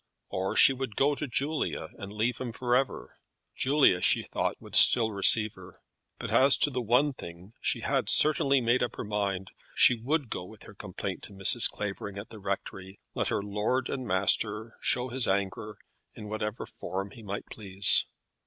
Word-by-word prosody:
Or 95 Hz, +1 st, -3 dB
she 135 Hz, -, +7 dB
would 130 Hz, -5 st, -6 dB
go 145 Hz, +2 st, +2 dB
to 150 Hz, +1 st, -5 dB
Julia 145 Hz, +5 st, -3 dB
and 100 Hz, -2 st, -8 dB
leave 110 Hz, +3 st, -2 dB
him 120 Hz, -3 st, -5 dB
for 120 Hz, +1 st, -1 dB
ever. 135 Hz, +1 st, -3 dB, 0.4 s
Julia, 135 Hz, -9 st, +3 dB
she -, -, +3 dB
thought, -, -, -3 dB
would -, -, -15 dB
still 110 Hz, -2 st, +6 dB
receive 105 Hz, +1 st, +4 dB
her. -, -, -15 dB, 0.4 s
But -, -, -6 dB
as 135 Hz, +1 st, +5 dB
to 145 Hz, -, +2 dB
one 125 Hz, +6 st, +2 dB
thing 90 Hz, -1 st, -12 dB
she -, -, -1 dB
had -, -, -1 dB
certainly 140 Hz, -3 st, +4 dB
made 120 Hz, +2 st, +1 dB
up 125 Hz, -, -2 dB
her -, -, -6 dB
mind; 100 Hz, -2 st, -3 dB, 0.2 s
she -, -, +6 dB
would 130 Hz, +3 st, -2 dB
go -, -, -4 dB
with 105 Hz, +4 st, -14 dB
her -, -, -13 dB
complaint 95 Hz, -1 st, -7 dB
to -, -, -12 dB
Mrs. 100 Hz, +4 st, +4 dB
Clavering 100 Hz, -1 st, -6 dB
at 100 Hz, -, -8 dB
the 110 Hz, -, -12 dB
rectory, 95 Hz, -1 st, -6 dB
let -, -, -2 dB
her -, -, -2 dB
lord 105 Hz, +6 st, -2 dB
and 130 Hz, -2 st, -5 dB
master 105 Hz, +4 st, 0 dB
show 125 Hz, +1 st, 0 dB
his 125 Hz, -1 st, 0 dB
anger 100 Hz, +2 st, -3 dB, 0.4 s
in 105 Hz, -, -9 dB
whatever 110 Hz, +1 st, -4 dB
form 100 Hz, +1 st, -6 dB
he 115 Hz, -, -13 dB
might 100 Hz, -1 st, -6 dB
please. 100 Hz, -2 st, +1 dB
110 Hz, 180 wpm, -28 LUFS, 100-125 Hz, 0.4 s, she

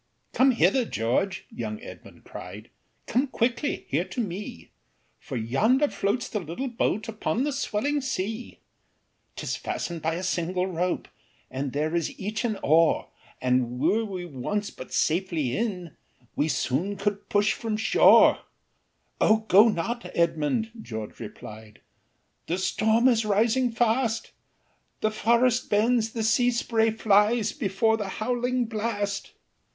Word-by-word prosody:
"Come 265 Hz, +1 st, +5 dB
hither, 260 Hz, +1 st, +3 dB
George," 180 Hz, -, -1 dB
young 110 Hz, -2 st, -5 dB
Edmund -, -, -12 dB
cried, -, -, -10 dB, 0.3 s
"Come 255 Hz, +5 st, +1 dB
quickly 250 Hz, +3 st, -1 dB
here -, -, 0 dB
to -, -, -7 dB
me, 190 Hz, -, -5 dB, 0.5 s
For 130 Hz, -, -6 dB
yonder 220 Hz, -, +2 dB
floats 210 Hz, +5 st, -1 dB
the 210 Hz, -, -3 dB
little 175 Hz, -, -5 dB
boat, 225 Hz, -2 st, -1 dB
Upon 225 Hz, +2 st, -1 dB
the 295 Hz, -, 0 dB
swelling 280 Hz, +1 st, -1 dB
sea. 225 Hz, -2 st, -4 dB, 0.8 s
"'Tis -, -, -3 dB
fasten'd 170 Hz, -2 st, -4 dB
by 160 Hz, +1 st, -1 dB
a 180 Hz, -, -4 dB
single 180 Hz, 0 st, -1 dB
rope, 180 Hz, -1 st, -2 dB, 0.4 s
And 135 Hz, +1 st, -3 dB
there 155 Hz, +4 st, -1 dB
is 170 Hz, -2 st, -2 dB
each 210 Hz, +2 st, -3 dB
an 220 Hz, -4 st, -1 dB
oar, 160 Hz, +2 st, +3 dB, 0.3 s
And 125 Hz, -1 st, +1 dB
were 225 Hz, -, +2 dB
we 190 Hz, -4 st, -5 dB
once 175 Hz, +8 st, -3 dB
but 130 Hz, -, -11 dB
safely 160 Hz, -6 st, 0 dB
in, 185 Hz, -8 st, -3 dB, 0.4 s
We 150 Hz, -, +1 dB
soon 160 Hz, +7 st, -1 dB
could 200 Hz, 0 st, -2 dB
push 205 Hz, +1 st, +3 dB
from 220 Hz, -2 st, -3 dB
shore." 220 Hz, -, +6 dB, 0.8 s
"Oh! 220 Hz, 0 st, +3 dB
go 205 Hz, +5 st, +8 dB
not, 230 Hz, +4 st, -2 dB
Edmund," 170 Hz, +7 st, +1 dB
George 110 Hz, -, -7 dB
replied, 110 Hz, 0 st, -10 dB, 0.7 s
"The 175 Hz, -, -1 dB
storm 220 Hz, +5 st, +2 dB
is 230 Hz, -3 st, +3 dB
rising 225 Hz, +4 st, +2 dB
fast, 230 Hz, 0 st, 0 dB, 0.7 s
The 215 Hz, -, +1 dB
forest 235 Hz, +3 st, +2 dB
bends, 225 Hz, +1 st, +2 dB
the 225 Hz, -, -2 dB
sea 235 Hz, +3 st, +3 dB
spray 230 Hz, -2 st, +1 dB
flies, 215 Hz, +1 st, +3 dB
Before 220 Hz, -2 st, +1 dB
the 205 Hz, -3 st, -4 dB
howling 245 Hz, +2 st, 0 dB
blast." 210 Hz, -3 st, -3 dB
210 Hz, 135 wpm, -26 LUFS, 170-230 Hz, 0.8 s, go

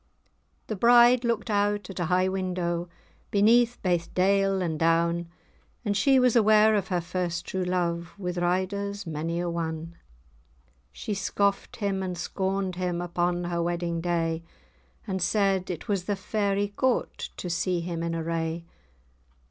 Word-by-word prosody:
The 215 Hz, -, -4 dB
bride 240 Hz, +3 st, +6 dB
looked 230 Hz, -1 st, -1 dB
out 205 Hz, -1 st, +1 dB
at 190 Hz, -, -8 dB
a 175 Hz, -, 0 dB
high 180 Hz, +2 st, +2 dB
window, 180 Hz, -2 st, -2 dB, 0.4 s
Beneath 230 Hz, +4 st, +4 dB
baith 175 Hz, -3 st, 0 dB
dale 195 Hz, +1 st, +3 dB
and 165 Hz, -4 st, -2 dB
down, 170 Hz, +1 st, +2 dB, 0.6 s
And 205 Hz, -1 st, 0 dB
she 265 Hz, +7 st, +4 dB
was 250 Hz, -2 st, +4 dB
aware 215 Hz, -1 st, +5 dB
of 200 Hz, -3 st, 0 dB
her 180 Hz, -2 st, 0 dB
first 175 Hz, 0 st, -3 dB
true 190 Hz, -1 st, -2 dB
love, 175 Hz, -1 st, -2 dB
With 180 Hz, -2 st, -3 dB
riders 200 Hz, +3 st, -1 dB
mony 165 Hz, +1 st, -3 dB
a 175 Hz, -, -1 dB
one. 165 Hz, -1 st, -4 dB, 1.0 s
She 210 Hz, -, -5 dB
scoffed 200 Hz, 0 st, -1 dB
him, 200 Hz, -3 st, -1 dB
and 180 Hz, -2 st, -3 dB
scorned 190 Hz, +1 st, -2 dB
him, 180 Hz, -1 st, -1 dB
Upon 175 Hz, 0 st, -1 dB
her 175 Hz, -1 st, -1 dB
wedding 170 Hz, 0 st, -2 dB
day; 165 Hz, -1 st, -1 dB, 0.6 s
And 190 Hz, -3 st, -3 dB
said, 190 Hz, 0 st, +1 dB
"It 170 Hz, -4 st, -5 dB
was 195 Hz, -4 st, -1 dB
the 205 Hz, -, 0 dB
Fairy 200 Hz, 0 st, -1 dB
Court, 255 Hz, +5 st, -1 dB
To -, -, -5 dB
see 175 Hz, +1 st, 0 dB
him 170 Hz, -1 st, -4 dB
in 165 Hz, 0 st, -2 dB
array! 165 Hz, 0 st, -2 dB
180 Hz, 150 wpm, -27 LUFS, 170-200 Hz, 1.0 s, bride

